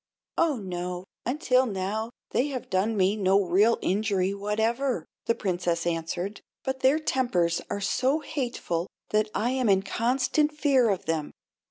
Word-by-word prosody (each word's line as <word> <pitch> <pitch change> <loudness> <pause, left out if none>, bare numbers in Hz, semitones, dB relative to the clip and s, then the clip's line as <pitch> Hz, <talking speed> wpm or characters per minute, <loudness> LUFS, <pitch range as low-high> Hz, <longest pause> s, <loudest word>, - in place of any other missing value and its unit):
"Oh, 330 -3 +3
no; 180 -3 -4 0.2
until 255 -1 +2
now 210 +2 -2 0.2
they 260 - +2
have 260 -6 -5
done 205 +4 +1
me 190 +2 +3
no 195 -1 +3
real 200 +5 +3
injury 195 -1 +1
whatever," 220 - 0 0.2
the 230 - +3
Princess 175 -3 -1
answered, 175 +4 -2 0.2
"but 265 0 -2
their 265 +3 +4
tempers 215 - +1
are 200 - -3
so 260 +8 +1
hateful 235 - -3 0.2
that 215 0 +2
I 235 +4 +1
am 255 -4 +1
in 195 -1 +4
constant 255 +7 +1
fear 270 -6 +4
of 195 -3 -1
them. 160 -2 -1
210 Hz, 150 wpm, -27 LUFS, 185-255 Hz, 0.2 s, their